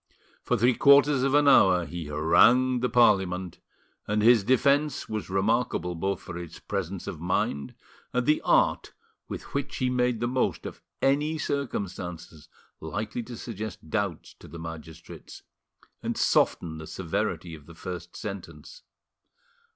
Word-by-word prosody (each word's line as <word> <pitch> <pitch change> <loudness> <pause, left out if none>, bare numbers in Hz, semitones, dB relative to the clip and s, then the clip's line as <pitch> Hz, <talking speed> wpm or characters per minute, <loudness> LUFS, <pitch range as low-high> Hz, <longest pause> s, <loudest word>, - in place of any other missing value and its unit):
For - - 0
three 125 +3 +3
quarters 140 +1 +5
of 135 +1 +2
an 145 0 +4
hour 95 -10 +5
he 85 +1 -6
harangued 115 +12 +4
the 125 - +1
Parliament, 95 -7 +2 0.5
and 105 0 0
his 115 -2 +6
defence 140 +5 +2
was 110 -2 -5
remarkable 95 -1 0
both 95 +3 -2
for 85 - -7
its 85 -1 -9
presence 95 -2 -4
of 75 - -6
mind 70 -5 -1 0.4
and 125 -1 0
the 150 +1 +2
art - - +2 0.4
with - - -6
which 140 0 -3
he 130 -1 0
made 125 -2 +1
the 120 - -1
most 125 +1 -1
of - - -8 0.2
any 150 +4 +2
circumstances 95 - -5 0.3
likely 110 +9 -4
to 120 0 -9
suggest 110 -8 -7
doubts 100 -6 -2
to - - -13
the 85 - -10
magistrates 80 0 -10 0.6
and - - -3
soften 80 -2 +1
the 80 - -9
severity 85 -1 -3
of 75 -3 -12
the 85 - -13
first 85 0 -7
sentence. 105 - -8
100 Hz, 145 wpm, -27 LUFS, 85-125 Hz, 0.6 s, his